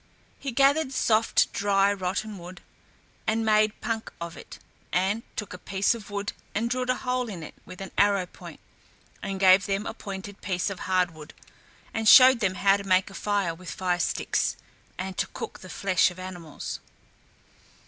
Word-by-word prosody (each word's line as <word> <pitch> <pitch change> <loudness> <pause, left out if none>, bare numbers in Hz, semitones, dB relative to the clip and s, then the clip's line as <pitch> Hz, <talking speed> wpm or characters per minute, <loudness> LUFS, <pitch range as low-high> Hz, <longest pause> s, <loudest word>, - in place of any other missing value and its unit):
He 275 - -4
gathered 275 +3 +3
soft, 225 -3 +2
dry 200 0 +3
rotten 195 +2 -3
wood 175 +1 -10 0.7
and 225 +1 +1
made 215 0 +3
punk 225 0 -3
of 170 0 -6
it, - - -11 0.3
and 195 +5 +1
took 210 -4 -5
a 180 - -8
piece 195 +5 +1
of 225 -4 -9
wood 205 0 -3 0.2
and 230 +3 0
drilled 255 0 -1
a 255 - +3
hole 250 -2 -2
in 180 -6 -6
it - - -9
with 185 +1 -10
an 195 - -7
arrow 200 -2 +4
point, - - -12 0.6
and 195 -1 -4
gave 190 0 +6
them 200 +1 -1
a - - -4
pointed 200 -2 -8
piece 185 +1 -1
of 190 - -6
hard 185 -2 +2
wood, 155 -1 -12 0.6
and 225 -1 +2
showed 255 -1 +9
them 190 -4 0
how 195 +1 +4
to 200 - -7
make 190 0 +2
a - - -12
fire 200 -4 0
with 180 +1 -10
fire 180 -2 -1
sticks, - - 0 0.4
and 185 0 -5
to - - +1
cook - - -6
the 185 - -11
flesh 190 -1 +2
of 180 - -12
animals. 180 -4 -7
195 Hz, 180 wpm, -26 LUFS, 185-220 Hz, 0.7 s, showed